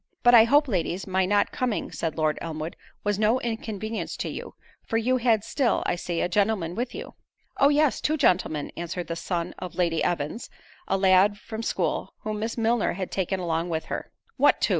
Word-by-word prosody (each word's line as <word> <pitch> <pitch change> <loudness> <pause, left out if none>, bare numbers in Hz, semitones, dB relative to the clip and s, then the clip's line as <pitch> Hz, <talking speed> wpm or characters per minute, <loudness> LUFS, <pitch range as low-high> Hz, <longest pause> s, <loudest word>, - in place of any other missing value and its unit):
"But 245 - +6
I 225 -2 +9
hope, 290 +5 +4
ladies, 185 -3 -1
my 190 -1 +1
not 205 +1 +2
coming," 245 -4 -2
said 165 -2 -3
Lord 155 -1 +1
Elmwood, 160 0 -5 0.3
"was 205 -1 0
no 220 +4 +3
inconvenience 220 -2 -4
to - - -3
you; - - -7 0.3
for 225 - -2
you 250 +3 +2
had 230 -4 +2
still, 265 0 +1
I - - +1
see, 175 -1 -3
a - - +1
gentleman 195 -2 +1
with 245 +5 -3
you." - - -7 0.5
"Oh! 280 - +6
yes, 295 -1 +2
two 310 +1 +1
gentlemen:" 180 - +1
answered 175 +1 -4
the 165 - -4
son 170 0 -3
of 180 - -7
Lady 170 -3 +1
Evans, 165 +6 -2 0.4
a - - +1
lad 190 +1 +4
from 220 +1 -6
school, - - -2
whom 215 -1 -3
Miss 225 +2 -3
Milner 230 0 +2
had 185 0 -5
taken 190 0 -1
along 170 -1 -1
with 160 -1 -2
her. - - -5 0.3
"What - - +4
two?" - - +1
200 Hz, 200 wpm, -26 LUFS, 175-230 Hz, 0.5 s, I